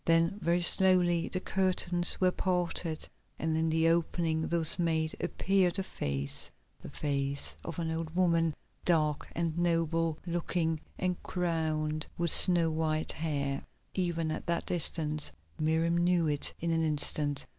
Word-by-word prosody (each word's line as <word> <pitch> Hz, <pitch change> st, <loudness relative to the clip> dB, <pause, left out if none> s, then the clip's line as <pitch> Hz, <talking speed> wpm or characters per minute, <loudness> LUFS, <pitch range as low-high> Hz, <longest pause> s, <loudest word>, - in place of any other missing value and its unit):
Then 165 Hz, +4 st, +2 dB
very 170 Hz, +1 st, +1 dB
slowly 175 Hz, -2 st, +3 dB
the 185 Hz, -, -3 dB
curtains 185 Hz, -2 st, -1 dB
were 185 Hz, -1 st, +3 dB
parted, 175 Hz, -3 st, -2 dB, 0.3 s
and 160 Hz, 0 st, -2 dB
in 160 Hz, 0 st, 0 dB
the 160 Hz, +1 st, +2 dB
opening 165 Hz, -1 st, 0 dB
thus 165 Hz, -1 st, +6 dB
made 160 Hz, -2 st, 0 dB
appeared 190 Hz, -2 st, 0 dB
a 195 Hz, -, -1 dB
face, 70 Hz, -, -1 dB, 0.3 s
the -, -, -9 dB
face 140 Hz, -1 st, -2 dB
of 165 Hz, -, -7 dB
an 165 Hz, -2 st, -2 dB
old 160 Hz, 0 st, -5 dB
woman, 165 Hz, -3 st, +1 dB, 0.3 s
dark 155 Hz, -4 st, 0 dB
and 165 Hz, -2 st, -2 dB
noble 165 Hz, -2 st, 0 dB
looking 170 Hz, -2 st, -2 dB, 0.2 s
and 180 Hz, -1 st, -2 dB
crowned 155 Hz, -3 st, -2 dB
with 170 Hz, -2 st, +2 dB
snow 170 Hz, -3 st, +7 dB
white 155 Hz, 0 st, -2 dB
hair. 140 Hz, -3 st, -3 dB, 0.3 s
Even 170 Hz, -3 st, -1 dB
at -, -, -6 dB
that 170 Hz, 0 st, -1 dB
distance 155 Hz, -3 st, +1 dB, 0.3 s
Miriam 160 Hz, +2 st, +1 dB
knew 175 Hz, -1 st, +2 dB
it 145 Hz, -1 st, 0 dB
in 170 Hz, 0 st, -2 dB
an 165 Hz, 0 st, +1 dB
instant. 145 Hz, -2 st, +2 dB
165 Hz, 145 wpm, -30 LUFS, 155-175 Hz, 0.3 s, snow